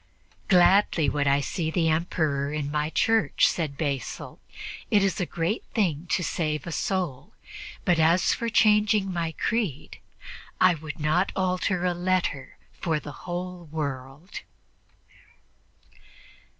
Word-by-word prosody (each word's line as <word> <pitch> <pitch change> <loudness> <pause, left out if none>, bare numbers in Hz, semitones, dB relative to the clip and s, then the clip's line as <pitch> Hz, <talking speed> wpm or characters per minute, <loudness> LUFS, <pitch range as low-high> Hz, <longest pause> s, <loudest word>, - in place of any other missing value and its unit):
"Gladly 180 -4 +4
would 145 0 0
I 140 +1 +3
see 160 +3 -2
the 165 0 +1
Emperor 155 -3 0
in 150 -1 -3
my 150 0 0
church," 225 +6 +3
said 150 -5 -2
Basil; 140 -6 -4 0.5
"it 205 -2 +4
is 195 -2 0
a 175 - -1
great 170 +6 -2
thing 175 -7 0
to 180 - 0
save 150 -2 -2
a 170 - -5
soul; 165 -4 -3 0.5
but 175 -2 +3
as 165 +3 +4
for 235 - -2
changing 210 -3 +3
my 170 -2 -1
creed, 205 - -2 0.6
I 185 -1 +6
would 155 0 -8
not 155 +6 +1
alter 185 -1 0
a 180 - +2
letter 175 -7 -1 0.2
for 160 -3 -1
the 150 - -8 0.2
whole 180 0 -5
world." 145 +1 -5
170 Hz, 130 wpm, -26 LUFS, 150-185 Hz, 0.6 s, I